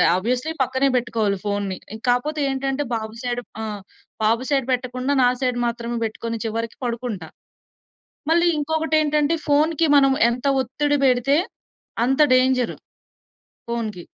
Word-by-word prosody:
ఆహ్, -, -, +5 dB
ఆబ్వియస్లీ 250 Hz, +10 st, -1 dB
పక్కనే 260 Hz, +2 st, +1 dB
బెట్టుకోవాలి 225 Hz, -5 st, 0 dB
ఫోనుని. 200 Hz, -2 st, -2 dB, 0.3 s
కాపోతే 295 Hz, +5 st, 0 dB
ఏంటంటే, 270 Hz, +1 st, -1 dB
బాబు 220 Hz, 0 st, -6 dB
సైడ్ 245 Hz, -1 st, -2 dB, 0.2 s
ఆ! -, -, -3 dB, 0.6 s
బాబు 225 Hz, +3 st, +2 dB
సైడ్ 270 Hz, -3 st, +1 dB
బెట్టకుండా 255 Hz, +2 st, -1 dB
నా 245 Hz, -, +6 dB
సైడ్ 250 Hz, -1 st, 0 dB
మాత్రమే 235 Hz, 0 st, -3 dB
బెట్టుకొని 230 Hz, +1 st, -5 dB
చివరికి 230 Hz, +1 st, -4 dB
పడుకుంటా. 230 Hz, -8 st, -4 dB, 1.0 s
మళ్ళీ 340 Hz, +1 st, +4 dB
ఇంకొకటెంటంటే, 310 Hz, 0 st, +1 dB
ఫోనుకి 310 Hz, +2 st, +3 dB
మనం 275 Hz, -1 st, +5 dB, 0.2 s
ఎంత 245 Hz, +3 st, -4 dB, 0.2 s
ఒత్తిడి 290 Hz, +4 st, 0 dB
బెడితే, 260 Hz, +2 st, +3 dB, 0.7 s
అంత 270 Hz, +3 st, +1 dB
డేంజరు 255 Hz, -1 st, +2 dB, 0.9 s
ఫోనుకి. 220 Hz, -7 st, -4 dB
250 Hz, 125 wpm, -22 LUFS, 230-285 Hz, 1.0 s, నా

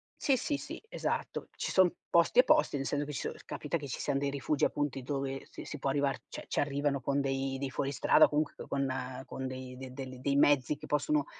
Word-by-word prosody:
sì, 270 Hz, -3 st, +2 dB
sì, 290 Hz, -, -1 dB
sì, -, -, -7 dB
esatto. -, -, -3 dB
Ci -, -, -3 dB
son 185 Hz, -2 st, +5 dB, 0.2 s
posti 170 Hz, +8 st, +4 dB
e -, -, +10 dB
posti, 310 Hz, -, +4 dB
nel 135 Hz, -, -3 dB
seno 145 Hz, +1 st, 0 dB
che 150 Hz, -, -6 dB
ci -, -, -3 dB
so -, -, -3 dB
capita 150 Hz, +3 st, -3 dB
che 145 Hz, -3 st, -7 dB
ci 125 Hz, -, -4 dB
sian 140 Hz, -1 st, 0 dB
dei 140 Hz, 0 st, 0 dB
rifugi, 140 Hz, +1 st, +1 dB
appunti, 145 Hz, -2 st, -1 dB
dove 135 Hz, 0 st, -3 dB
si -, -, -9 dB
si 150 Hz, -, -6 dB
può 135 Hz, -, 0 dB
arrivar 140 Hz, -1 st, +1 dB
cioè, -, -, -7 dB
c'arrivano 145 Hz, -1 st, 0 dB
con 140 Hz, +2 st, +1 dB
dei 135 Hz, 0 st, -1 dB
dei 135 Hz, 0 st, -3 dB
fuoristrada 140 Hz, 0 st, +4 dB
o -, -, -1 dB
comunq 150 Hz, 0 st, -1 dB
con 140 Hz, -1 st, 0 dB, 0.4 s
con 130 Hz, 0 st, -5 dB
dei 130 Hz, 0 st, -6 dB
de 130 Hz, 0 st, -8 dB
delli 130 Hz, -1 st, -7 dB
dei 140 Hz, +1 st, +1 dB
mezzi 145 Hz, 0 st, +4 dB
che -, -, -9 dB
possono, 300 Hz, -, +1 dB
140 Hz, 225 wpm, -32 LUFS, 135-150 Hz, 0.4 s, e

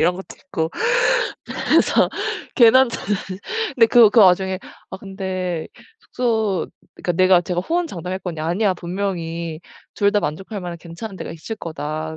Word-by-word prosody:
이런 180 Hz, -, +3 dB
것도 190 Hz, +1 st, -10 dB
있고 165 Hz, -4 st, -3 dB, 0.8 s
그래서 -, -, +3 dB, 0.5 s
괜한 255 Hz, +2 st, +7 dB
자존 210 Hz, -3 st, -2 dB, 0.6 s
근데 235 Hz, -4 st, +6 dB
그 230 Hz, -1 st, +7 dB
그 220 Hz, +2 st, +4 dB
와중에 190 Hz, -1 st, +4 dB, 0.3 s
아 -, -, -6 dB
근데 190 Hz, -3 st, -4 dB, 0.3 s
숙소 220 Hz, -, -1 dB, 0.3 s
그러니까 175 Hz, -, -2 dB
내가 185 Hz, +1 st, +5 dB
제가 175 Hz, 0 st, -2 dB
호언장담했거든요. 185 Hz, -, -3 dB
"아니야. 190 Hz, +5 st, +1 dB
분명히 170 Hz, -3 st, -4 dB, 0.3 s
2 200 Hz, 0 st, +2 dB
다 205 Hz, -, +2 dB
만족할 195 Hz, +7 st, -4 dB
만한 175 Hz, -1 st, -6 dB
괜찮은 175 Hz, +5 st, -8 dB
데가 -, -, -6 dB
있을 165 Hz, +7 st, -6 dB
거다, 155 Hz, -2 st, -5 dB
185 Hz, 305 characters per minute, -21 LUFS, 170-205 Hz, 0.8 s, 괜한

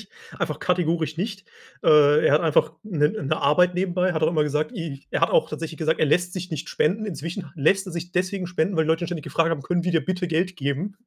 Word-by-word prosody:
tatsächlich, -, -, -21 dB, 0.3 s
einfach -, -, -2 dB
kategorisch 165 Hz, -3 st, 0 dB
nicht. 200 Hz, +2 st, -4 dB, 0.4 s
Äh, 150 Hz, 0 st, +6 dB
er 145 Hz, -, +5 dB
hat 150 Hz, -, +4 dB
einfach 155 Hz, -1 st, +2 dB
'ne 155 Hz, -8 st, +1 dB
'ne 180 Hz, -11 st, -2 dB
Arbeit 180 Hz, +5 st, +3 dB
nebenbei. 180 Hz, 0 st, 0 dB
Er 180 Hz, -, -1 dB
hat 160 Hz, -, -1 dB
auch 155 Hz, -, +4 dB
immer 155 Hz, -3 st, +1 dB
gesagt, 150 Hz, -, -1 dB
i 165 Hz, -, -7 dB
er -, -, -1 dB
hat -, -, +3 dB
auch 160 Hz, 0 st, +3 dB
tatsächlich 160 Hz, +1 st, -6 dB
gesagt, 160 Hz, 0 st, 0 dB
er 155 Hz, -, +4 dB
lässt 180 Hz, +4 st, +1 dB
sich 185 Hz, -1 st, -6 dB
nicht 155 Hz, -2 st, -5 dB
spenden. 200 Hz, +8 st, 0 dB
Inzwischen 170 Hz, 0 st, -5 dB
lässt 190 Hz, +6 st, +2 dB
er 185 Hz, -, -7 dB
sich 170 Hz, +1 st, -5 dB
deswegen 185 Hz, +1 st, -1 dB
spenden, 180 Hz, +1 st, -1 dB
weil 160 Hz, -, +3 dB
die -, -, -4 dB
Leute 165 Hz, +1 st, +1 dB
ständig 165 Hz, -5 st, -5 dB
gefragt 165 Hz, 0 st, +1 dB
haben: 150 Hz, -4 st, -2 dB
„Können 175 Hz, -1 st, -1 dB
wir 180 Hz, -, 0 dB
dir 160 Hz, -4 st, +1 dB
bitte 180 Hz, +1 st, -2 dB
Geld 180 Hz, +3 st, -1 dB
geben?" 150 Hz, +8 st, -3 dB
165 Hz, 250 wpm, -24 LUFS, 155-180 Hz, 0.4 s, Äh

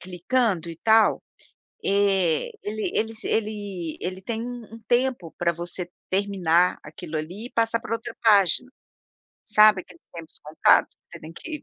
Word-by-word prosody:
clicando 185 Hz, 0 st, -1 dB
e 165 Hz, -, -7 dB
tal, 220 Hz, 0 st, +4 dB, 0.6 s
eh, 195 Hz, -5 st, +2 dB
ele 215 Hz, +1 st, -3 dB
eles 225 Hz, 0 st, -2 dB
ele 205 Hz, -6 st, -3 dB
ele 185 Hz, +1 st, -5 dB
tem 225 Hz, +3 st, -4 dB
um 240 Hz, -2 st, -8 dB
um -, -, -12 dB
tempo 240 Hz, -8 st, 0 dB
para 170 Hz, -1 st, +1 dB
você 175 Hz, +1 st, -5 dB, 0.2 s
terminar 185 Hz, -3 st, +2 dB
aquilo 155 Hz, +1 st, -7 dB
ali 180 Hz, +9 st, -6 dB
e -, -, -20 dB
passar 230 Hz, -1 st, 0 dB
para 225 Hz, -, -4 dB
outra 230 Hz, 0 st, -5 dB
página, 210 Hz, +3 st, +4 dB, 0.7 s
sabe 210 Hz, -2 st, +5 dB
aqueles 180 Hz, -2 st, -19 dB
tempos 165 Hz, -2 st, -11 dB
contados 155 Hz, +1 st, +3 dB
que -, -, -69 dB
você -, -, -9 dB
tem 160 Hz, +1 st, -11 dB
que 305 Hz, -, -7 dB
200 Hz, 155 wpm, -24 LUFS, 175-225 Hz, 0.7 s, sabe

